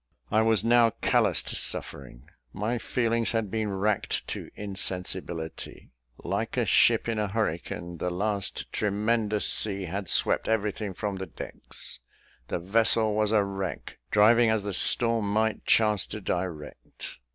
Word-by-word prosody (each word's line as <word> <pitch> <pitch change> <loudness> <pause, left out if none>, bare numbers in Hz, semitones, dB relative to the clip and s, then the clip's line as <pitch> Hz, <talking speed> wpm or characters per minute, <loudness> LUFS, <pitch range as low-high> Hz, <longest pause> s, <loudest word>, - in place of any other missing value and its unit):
I 110 - +4
was 110 -3 +3
now 120 0 +5
callous - - +2
to - - -2
suffering. 65 0 -2 0.3
My 115 +4 -2
feelings 115 -1 0
had 110 -4 -1
been 110 -2 -1
racked 100 +1 -1
to - - -5
insensibility. 95 -4 -3 0.3
Like - - -3
a - - +2
ship - - +4
in 115 -2 -1
a 105 - 0
hurricane, 85 -4 -3
the 90 - -1
last 100 +2 -3
tremendous 105 +1 0
sea 100 -2 +1
had 95 +2 -4
swept - - +2
everything 105 -2 -1
from 100 -1 -3
the 95 0 -5
decks 80 - -7 0.5
the - - -2
vessel 110 +4 +2
was 105 0 +1
a 105 -2 +4
wreck, 95 -1 -5
driving 115 +3 +5
as 110 -2 +1
the 100 -1 -4
storm 115 +1 +2
might 110 +1 0
chance 105 -3 +3
to 105 - -6
direct. 90 -6 -6
105 Hz, 145 wpm, -27 LUFS, 95-110 Hz, 0.5 s, now